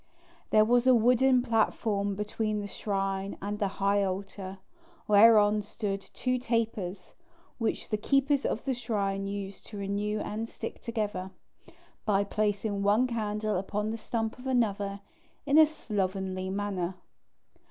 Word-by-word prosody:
There 215 Hz, 0 st, +5 dB
was 245 Hz, +2 st, +3 dB
a 255 Hz, -, +7 dB
wooden 250 Hz, +2 st, +4 dB
platform 215 Hz, -3 st, +1 dB
between 210 Hz, +1 st, -2 dB
the 205 Hz, -, -4 dB
shrine 195 Hz, -1 st, -2 dB
and 205 Hz, +1 st, -4 dB
the 205 Hz, -, +1 dB
high 200 Hz, +1 st, +1 dB
altar, 195 Hz, 0 st, -4 dB, 0.5 s
whereon 210 Hz, 0 st, +6 dB
stood 200 Hz, -1 st, -4 dB
two 255 Hz, +5 st, -2 dB
tapers, 225 Hz, -6 st, -2 dB, 0.5 s
which 225 Hz, -, -1 dB
the 215 Hz, -, -1 dB
keepers 275 Hz, +5 st, +2 dB
of -, -, -2 dB
the 270 Hz, -, +1 dB
shrine 200 Hz, -5 st, -2 dB
used 200 Hz, -1 st, -5 dB
to 210 Hz, -, -8 dB
renew 200 Hz, +2 st, -2 dB
and 220 Hz, +3 st, -4 dB
stick -, -, -7 dB
together, 210 Hz, -5 st, -3 dB, 0.7 s
by 200 Hz, -2 st, +2 dB
placing 205 Hz, 0 st, -1 dB
one 205 Hz, +5 st, +4 dB
candle 215 Hz, -3 st, -1 dB
upon 210 Hz, +3 st, -2 dB
the -, -, -2 dB
stump 225 Hz, +1 st, -3 dB
of 255 Hz, -, -8 dB
another 205 Hz, -5 st, 0 dB, 0.4 s
in 290 Hz, +2 st, +5 dB
a 315 Hz, -, +8 dB
slovenly 190 Hz, -9 st, -3 dB
manner. 190 Hz, -2 st, -2 dB
210 Hz, 140 wpm, -29 LUFS, 200-230 Hz, 0.7 s, a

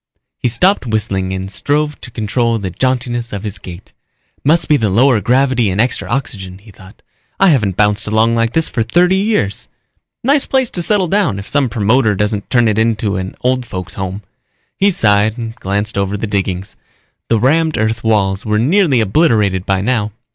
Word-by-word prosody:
He -, -, 0 dB
stopped 130 Hz, -, +1 dB
whistling 100 Hz, -4 st, -1 dB
and 95 Hz, +1 st, -4 dB
strove 150 Hz, +5 st, -1 dB
to -, -, -9 dB
control 115 Hz, +1 st, -1 dB
the 95 Hz, -4 st, -4 dB
jauntiness 120 Hz, +1 st, -2 dB
of 100 Hz, -1 st, -5 dB
his 105 Hz, -1 st, -6 dB
gait. 90 Hz, +1 st, -11 dB, 0.5 s
Must 160 Hz, +4 st, +2 dB
be 150 Hz, -, +4 dB
the 110 Hz, -7 st, +1 dB
lower 115 Hz, +3 st, +3 dB
gravity 125 Hz, -2 st, +2 dB
and 95 Hz, +2 st, -2 dB
extra 120 Hz, +3 st, 0 dB
oxygen, 100 Hz, -8 st, -4 dB
he 105 Hz, +2 st, -17 dB
thought. 95 Hz, +1 st, -17 dB, 0.4 s
_I 195 Hz, -2 st, +5 dB
haven't 105 Hz, -, +1 dB
bounced 105 Hz, 0 st, +1 dB
along 110 Hz, +2 st, +2 dB
like 115 Hz, 0 st, 0 dB
this 160 Hz, -1 st, +2 dB
for 115 Hz, -, -2 dB
thirty 175 Hz, +11 st, +2 dB
years. 195 Hz, -, -1 dB, 0.5 s
Nice 280 Hz, +3 st, +2 dB
place 265 Hz, -3 st, +1 dB
to 175 Hz, -, -2 dB
settle 195 Hz, +1 st, +1 dB
down 180 Hz, -, +1 dB
if 100 Hz, -, -8 dB
some 140 Hz, -3 st, +1 dB
promoter 110 Hz, 0 st, +2 dB
doesn't 105 Hz, 0 st, -2 dB
turn 120 Hz, -2 st, +3 dB
it 110 Hz, 0 st, +1 dB
into 110 Hz, -2 st, 0 dB
an 95 Hz, 0 st, -5 dB
old 125 Hz, 0 st, 0 dB
folks 95 Hz, -5 st, -7 dB
home._ 95 Hz, +1 st, -5 dB, 0.5 s
He 200 Hz, -, +3 dB
sighed 110 Hz, -, +2 dB
and 115 Hz, -2 st, -5 dB
glanced 100 Hz, +1 st, -2 dB
over 100 Hz, +1 st, -1 dB
the 110 Hz, -, -3 dB
diggings. 95 Hz, -2 st, -3 dB, 0.5 s
The 115 Hz, -, +2 dB
rammed 155 Hz, +6 st, +2 dB
earth 110 Hz, 0 st, -1 dB
walls 100 Hz, -3 st, +1 dB
were 105 Hz, -1 st, 0 dB
nearly 145 Hz, -, +3 dB
obliterated 105 Hz, -, +1 dB
by 95 Hz, -1 st, +1 dB
now. 110 Hz, -2 st, -1 dB
110 Hz, 185 wpm, -15 LUFS, 100-130 Hz, 0.5 s, I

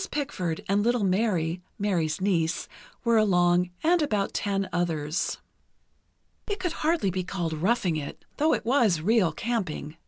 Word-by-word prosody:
Pickford 185 Hz, -, -3 dB
and 200 Hz, +1 st, +2 dB
little 240 Hz, 0 st, +1 dB
Mary 185 Hz, -4 st, +1 dB, 0.2 s
(Mary's 175 Hz, -6 st, 0 dB
niece) 170 Hz, -4 st, 0 dB, 0.4 s
were 235 Hz, -2 st, +3 dB
along, 180 Hz, -3 st, +3 dB
and 340 Hz, +1 st, +4 dB
about 210 Hz, -9 st, 0 dB
ten 195 Hz, -1 st, -1 dB
others. 165 Hz, -3 st, -1 dB, 1.1 s
It 410 Hz, -2 st, -2 dB
could 360 Hz, -2 st, -1 dB
be -, -, -7 dB
hardly 310 Hz, -, +1 dB
be 185 Hz, +1 st, -2 dB
called 175 Hz, -3 st, -3 dB
roughing 180 Hz, +1 st, +1 dB
it, 145 Hz, -2 st, -7 dB
though 310 Hz, +2 st, +3 dB
it -, -, -6 dB
was 230 Hz, -, +3 dB
real 195 Hz, 0 st, +3 dB
camping. 170 Hz, -6 st, -3 dB
195 Hz, 150 wpm, -27 LUFS, 170-235 Hz, 1.1 s, and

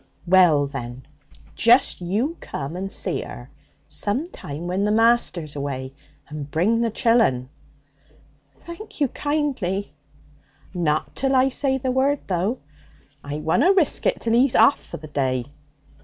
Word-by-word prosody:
'Well, 175 Hz, -5 st, +5 dB
then, 130 Hz, -2 st, -7 dB, 0.5 s
just 240 Hz, -2 st, +4 dB
you 215 Hz, -, -1 dB
come 140 Hz, +4 st, -6 dB
and 195 Hz, +2 st, -4 dB
see -, -, -2 dB
'er -, -, -10 dB, 0.4 s
some 255 Hz, +12 st, -1 dB
time 160 Hz, -1 st, -7 dB
when 185 Hz, +3 st, -1 dB
the 210 Hz, -, +1 dB
master's 220 Hz, -9 st, +2 dB
away. 135 Hz, -2 st, -4 dB, 0.3 s
And 150 Hz, -1 st, -7 dB
bring 195 Hz, +10 st, +1 dB
the 235 Hz, -, +1 dB
chillun.' 225 Hz, -, +2 dB, 1.0 s
'Thank 340 Hz, -, -11 dB
you 285 Hz, -3 st, +2 dB
kindly.' 255 Hz, -, -2 dB, 0.8 s
'Not 155 Hz, -4 st, -1 dB
till 270 Hz, 0 st, +1 dB
I 260 Hz, +1 st, +4 dB
say 265 Hz, 0 st, 0 dB
the 260 Hz, 0 st, -2 dB
word, 270 Hz, +2 st, +1 dB
though! 195 Hz, +7 st, -1 dB, 0.6 s
I 145 Hz, +1 st, -5 dB
wunna 250 Hz, -, +3 dB
risk 360 Hz, -7 st, +1 dB
it -, -, +1 dB
till 230 Hz, -, 0 dB
he's 250 Hz, +2 st, +3 dB
off 280 Hz, -, +5 dB
for -, -, -8 dB
the 155 Hz, -, -10 dB
day. 130 Hz, -4 st, -1 dB
195 Hz, 140 wpm, -23 LUFS, -, 1.0 s, Well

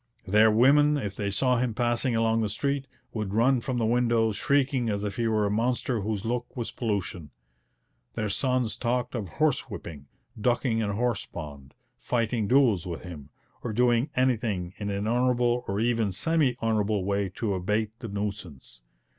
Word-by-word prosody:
Their 105 Hz, +3 st, +5 dB
women, 145 Hz, +7 st, +5 dB
if 105 Hz, -8 st, -3 dB
they 100 Hz, -1 st, -2 dB
saw 125 Hz, +5 st, +2 dB
him 120 Hz, -2 st, -1 dB
passing 120 Hz, +1 st, +1 dB
along 115 Hz, 0 st, +2 dB
the 110 Hz, -, 0 dB
street, 140 Hz, +5 st, -2 dB, 0.3 s
would 105 Hz, -3 st, -3 dB
run 125 Hz, +2 st, +3 dB
from 125 Hz, +1 st, -2 dB
the 115 Hz, -, +1 dB
windows 115 Hz, -2 st, +2 dB
shrieking 135 Hz, 0 st, +1 dB
as 100 Hz, -1 st, -2 dB
if 100 Hz, -1 st, -4 dB
he 115 Hz, -1 st, +1 dB
were 110 Hz, -2 st, +2 dB
a 100 Hz, -, 0 dB
monster 120 Hz, +1 st, 0 dB
whose 105 Hz, 0 st, -3 dB
look 120 Hz, +2 st, -3 dB
was 120 Hz, -, -3 dB
pollution. 100 Hz, -, -3 dB, 0.9 s
Their 110 Hz, -1 st, -1 dB
sons 125 Hz, +2 st, 0 dB
talked 125 Hz, 0 st, -1 dB
of 105 Hz, -7 st, -4 dB
horse 155 Hz, -4 st, 0 dB
whipping, 80 Hz, -9 st, -8 dB, 0.3 s
ducking 120 Hz, +1 st, +1 dB
in 110 Hz, -2 st, 0 dB
a 100 Hz, -, -2 dB
horse 120 Hz, -2 st, -1 dB
pond, 70 Hz, -4 st, -9 dB, 0.2 s
fighting 115 Hz, -2 st, -1 dB
duels 120 Hz, -9 st, +3 dB
with 85 Hz, -2 st, -5 dB
him, 80 Hz, -6 st, -9 dB, 0.3 s
or 115 Hz, -, -4 dB
doing 120 Hz, +3 st, +2 dB
anything 110 Hz, -8 st, 0 dB
in 105 Hz, -1 st, -4 dB
an 100 Hz, +1 st, -2 dB
honourable 125 Hz, 0 st, +2 dB
or 100 Hz, +1 st, -1 dB
even 115 Hz, -3 st, +1 dB
semi 135 Hz, -, +1 dB
honourable 105 Hz, -3 st, +1 dB
way 100 Hz, 0 st, 0 dB
to 110 Hz, -4 st, -1 dB
abate 105 Hz, +4 st, -1 dB
the 115 Hz, -, -6 dB
nuisance. 100 Hz, -, -5 dB
115 Hz, 175 wpm, -27 LUFS, 100-125 Hz, 0.9 s, Their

